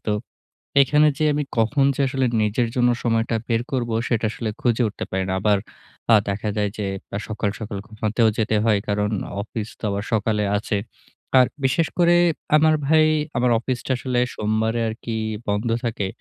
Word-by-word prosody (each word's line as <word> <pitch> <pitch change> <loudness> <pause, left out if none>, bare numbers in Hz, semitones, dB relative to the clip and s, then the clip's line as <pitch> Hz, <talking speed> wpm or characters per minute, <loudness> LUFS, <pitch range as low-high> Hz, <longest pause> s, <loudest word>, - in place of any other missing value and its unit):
তো 105 - +1 0.7
এখানে 150 +3 +4
যে 155 - +1
আমি 145 0 0 0.2
কখন 135 +5 +3
যে - - 0
আসলে 130 0 0 0.2
নিজের 110 +3 +1
জন্য 125 -1 +3
সময়টা 115 0 +1
বের 115 0 +1
করব 125 -3 -1 0.2
সেটা 115 -2 0
আসলে 115 -2 -4
খুঁজে 120 0 +2
উঠতে 105 - -5
পারি 95 0 0
না। - - 0
আবার 105 -1 +3 0.6
আ - - +9
দেখা 105 +2 -2
যায় 105 -1 +1
যে 105 - -2 0.4
সকাল 105 -1 -2
সকাল 105 -2 -5
ঘুমাতেও 110 +1 0
যেতে 110 -1 +1
হয়। 105 -3 +3
কারণ 105 +1 0 0.3
অফিস 110 0 -5
তো - - -25
আবার 100 +1 -2
সকালে 105 -1 +1
আছে। 105 0 -2 0.6
আর 125 - +7 0.2
বিশেষ 150 +5 +2
করে 175 0 +5 0.4
আমার 155 0 +4
ভাই 155 0 +5 0.3
আমার 125 0 +2
অফিসটা 130 +2 -3
আসলে 125 -1 -1 0.2
সোমবারে 110 +2 0
আরকি 110 0 -5 0.3
বন্ধ 105 +3 0 0.2
থাকে। 105 -4 -2
115 Hz, 170 wpm, -22 LUFS, 105-125 Hz, 0.7 s, আ